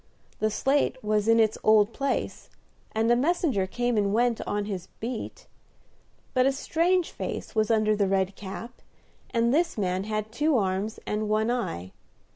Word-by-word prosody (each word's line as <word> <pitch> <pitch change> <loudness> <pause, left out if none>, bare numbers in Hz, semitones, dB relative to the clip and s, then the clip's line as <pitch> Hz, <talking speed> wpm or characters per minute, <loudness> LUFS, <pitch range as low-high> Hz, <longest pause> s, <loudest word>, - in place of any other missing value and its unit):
The 215 - +2
slate 270 +7 +1
was 210 0 +1
in 225 0 +5
its 220 -1 +2
old 215 0 +5
place, 275 -1 -2 0.4
and 225 +2 +1
a - - +6
messenger 270 - +1
came 240 +3 -1
and 200 -1 +2
went 235 +1 +2
on 205 0 -1
his 190 -4 -5
beat; 245 - -5 0.9
but 255 0 +4
a - - +4
strange 335 +6 +1
face - - -5
was 215 -1 +1
under 215 -1 +3
the 205 -1 +1
red 190 0 0
cap, 210 +5 -8 0.5
and 235 +1 +1
this 335 -1 +1
man 185 -1 -1
had 215 0 -3
two 295 +4 +2
arms 195 +1 -1
and 210 0 -2
one 215 +2 +2
eye. 95 - -3
220 Hz, 165 wpm, -27 LUFS, 205-245 Hz, 0.9 s, a